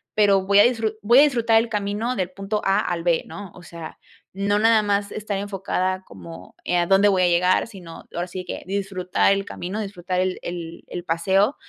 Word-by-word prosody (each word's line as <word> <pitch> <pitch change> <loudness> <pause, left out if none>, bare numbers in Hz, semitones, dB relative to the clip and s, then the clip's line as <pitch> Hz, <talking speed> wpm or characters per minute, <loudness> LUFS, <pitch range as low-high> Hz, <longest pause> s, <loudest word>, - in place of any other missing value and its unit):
pero 200 -2 +4
voy 200 +1 +4
a - - +9
disfru 225 -3 +1
voy 235 +5 +6
a - - +9
disfrutar 235 -6 +3
el 230 - -2
camino 210 +3 -2
del 185 -2 -2
punto 200 +2 -3
A 195 0 +3
al 170 -2 -2
B", 170 -2 +2
¿no? 200 -3 -9
O 180 - -13
sea, 170 -2 -9 0.4
no 205 +1 +1
nada 225 -1 +4
más 200 0 -1
estar 210 -2 -4
enfocada 190 -2 -2
como, 90 - -12
eh, 180 - 0
a 175 0 +1
dónde 195 +1 +5
voy 190 -2 +3
a 180 - +4
llegar, 180 +4 +2
sino 185 -7 -11
ahora 175 +1 -3
sí 185 +1 -6
que, - - -7
disfrutar 195 -1 0
el 195 0 -2
camino, 190 +3 -5
disfrutar 185 -3 -3
el 185 0 -1
el 170 -1 -7
el 175 -1 -6
paseo, 190 - +1
195 Hz, 210 wpm, -23 LUFS, 180-205 Hz, 0.4 s, a